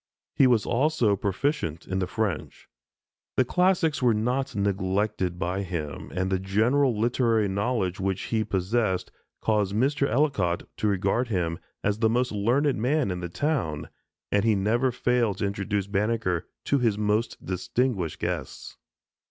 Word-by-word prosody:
He 135 - +5
was 120 -4 +3
also 125 -5 +2
proficient 95 - -2
in 95 +1 -1
the 90 - -1
French. 105 -6 -3 0.7
The 130 - +4
classics 180 -1 +2
were 120 -3 +4
not 125 +5 -1
neglected 100 -2 0
by 90 +1 -1
him, 85 -7 -5
and 95 +1 -1
the 95 - +1
general 110 +6 +2
literary 115 -2 +2
knowledge 100 -2 -1
which 95 0 -1
he 110 -1 0
possessed 100 0 0 0.3
caused 105 -3 +1
Mr. 140 +4 +2
Ellicott 110 - +1
to 110 - 0
regard 105 +5 +1
him 85 -6 -1 0.2
as 100 +1 0
the 110 -1 +3
most 125 +2 +1
learned 125 +8 +1
man 130 -3 +1
in 90 - -3
the 90 -1 -5
town, 85 - -1 0.4
and 100 - +2
he 110 -2 +3
never 115 +6 +1
failed 120 -4 +1
to 100 - -1
introduce 100 0 -1
Banneker 100 -3 -1 0.2
to 140 - +2
his 115 -4 +1
most 105 +2 -1
distinguished 95 - -1
guests. - - -4
105 Hz, 150 wpm, -26 LUFS, 95-125 Hz, 0.7 s, He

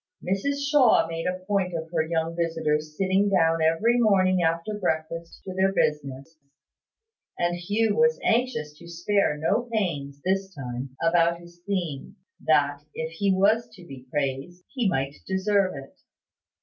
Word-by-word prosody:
Mrs 280 +10 -1
Shaw 280 -6 +5
made 165 +1 -4
a 185 0 -4
point 190 -3 0
of 160 0 -5
her 165 -2 +1
young 165 +1 -2
visitors 155 -2 -1
sitting 195 +1 +2
down 165 -4 +3
every 190 +10 +3
morning 185 -5 +3
after 165 +5 0
breakfast 165 -3 -3
to 190 - -6
their 190 +1 +2
business; 150 -2 -2 1.0
and 175 0 0
Hugh 205 +5 0
was 235 0 +3
anxious 225 -11 0
to 170 - -13
spare 175 -1 0
no 210 +10 0
pains, 145 -10 -2
this 190 0 -1
time, 130 -1 -6
about 170 0 +3
his 175 0 -16
theme, 175 -9 -3 0.3
that, 145 -2 +2
if 160 0 -4
he 195 +4 0
was 205 +5 +2
to 180 - -14
be 130 -4 -11
praised, 145 +5 -3
he 245 -7 +1
might 135 -3 -2
deserve 190 -1 +1
it. 135 0 -11
175 Hz, 150 wpm, -25 LUFS, 155-195 Hz, 1.0 s, Shaw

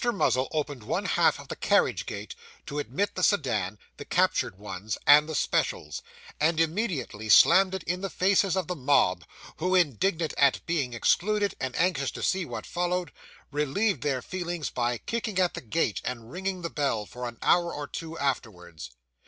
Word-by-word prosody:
Muzzle 195 - +1
opened 145 -4 -3
one 105 - -2
half - - +2
of - - -11
the - - -5
carriage - - +1
gate, - - -6 0.3
to 145 - -4
admit 200 +7 -2
the 185 - -4
sedan, 130 - +1 0.2
the - - -7
captured 95 - +1
ones, 105 0 -5
and 150 +2 +7
the 160 - -3
specials; 75 - -1 0.4
and 160 +2 +2
immediately 165 - -1
slammed 190 - +6
it 190 - -5
in 180 +2 -2
the 195 - -3
faces 190 0 +2
of 185 - 0
the 180 - -4
mob, 125 - +2 0.3
who, 180 +3 0
indignant 170 - +1
at 140 -2 +3
being 140 -8 -1
excluded, 205 - +1
and 130 -1 -3
anxious 165 -6 +1
to - - -7
see 190 -2 +1
what - - -6
followed, 180 0 -2 0.4
relieved 150 - 0
their 135 -3 -1
feelings 175 -3 -4
by 120 -1 -1
kicking 220 - -4
at 180 -2 +2
the - - -6
gate 115 - -1
and 115 -1 -5
ringing 185 +1 -4
the 170 - -2
bell, 135 -8 -1
for 125 +3 -6
an 120 -1 -8
hour 170 -1 +3
or 145 - -5
two 165 +3 -7
afterwards. 90 - -4
155 Hz, 175 wpm, -27 LUFS, 125-180 Hz, 0.4 s, and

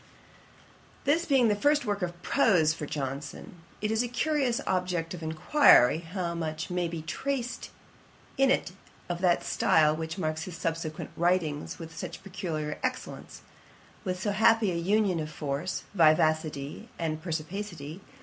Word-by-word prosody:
This 320 +5 +2
being 265 -5 +4
the 210 - +3
first 290 +6 +3
prose 210 - -1
work 205 0 -2 0.8
of 150 - -4
Johnson, 140 +4 -5 0.2
it 215 0 0
is 220 +1 +2
a 245 - -1
curious 255 0 0
object 180 -3 -1
of 175 - -7
inquiry 160 - +5
how 170 +1 -4
much 155 -1 -4
may 180 -1 0
be 165 -1 -5
traced 250 - -3 0.7
in 270 -1 +4
it 260 - +1 0.4
of 175 0 -3
that 180 -2 +3
style 155 -1 +3
which 160 +2 -5
marks 155 -2 -2
his 175 -2 -7
subsequent 160 -1 -3
writings 170 -4 0
with 165 -1 -9
such 180 - -7
peculiar 165 -6 -4
excellence; 255 0 -5 0.6
with 185 -2 -2
so 205 +2 -1
happy 220 0 +4
an 170 -1 -2
union 200 -2 +2
of 155 -1 -3
force, 150 +4 -3
vivacity, 155 -4 +2
and 160 -2 -2
perspicuity. 170 0 -5
175 Hz, 145 wpm, -28 LUFS, 155-210 Hz, 0.8 s, inquiry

